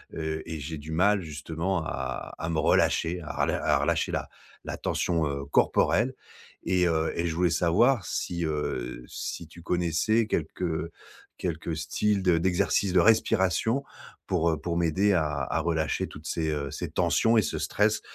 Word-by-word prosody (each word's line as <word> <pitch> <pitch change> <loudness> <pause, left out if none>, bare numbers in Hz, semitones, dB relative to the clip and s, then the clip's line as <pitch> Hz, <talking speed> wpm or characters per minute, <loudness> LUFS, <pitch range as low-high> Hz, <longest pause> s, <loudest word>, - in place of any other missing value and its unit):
heu 80 -1 -3
et 80 - -4
j'ai 80 +3 -5
du 75 +2 -8
mal 100 +5 +3
justement 80 +3 -3
à 65 -2 -4
à 80 - -3
me 80 - -1
relâcher, 85 +3 +2
à 75 - -4
relâ - - 0
à - - +3
relâcher - - 0
la - - -2 0.4
la - - -5
tension, 85 -3 0
heu, 70 -1 -3
corporelle 70 - +2 0.5
et 90 -1 +3
heu 80 -1 +1
et 85 - 0
je 80 - -2
voulais 90 +1 +3
savoir 95 +8 +3
si, 85 -1 -2
heu, 75 -5 -3
si 85 - -5
tu 85 +2 -14
connaissais 90 +7 +1
quelques 85 -1 -2 0.5
quelques 85 -2 -3
styles 95 +6 0
de 90 -2 +4
d'exercices 95 +2 +1
de 90 - +5
respiration 110 - +3 0.4
pour, 85 -2 +2
heu, 80 - -1
pour 85 -1 -2
m'aider 85 +4 +2
à 85 -4 +2 0.2
à 65 - -1
relâcher 80 -2 0
toutes 75 +2 -10
ces, 80 -2 -1
heu, 70 -2 -3
ces - - -4
tensions 115 +1 +2
et - - +6
ce - - -2
stress - - +1
85 Hz, 170 wpm, -27 LUFS, 80-90 Hz, 0.5 s, et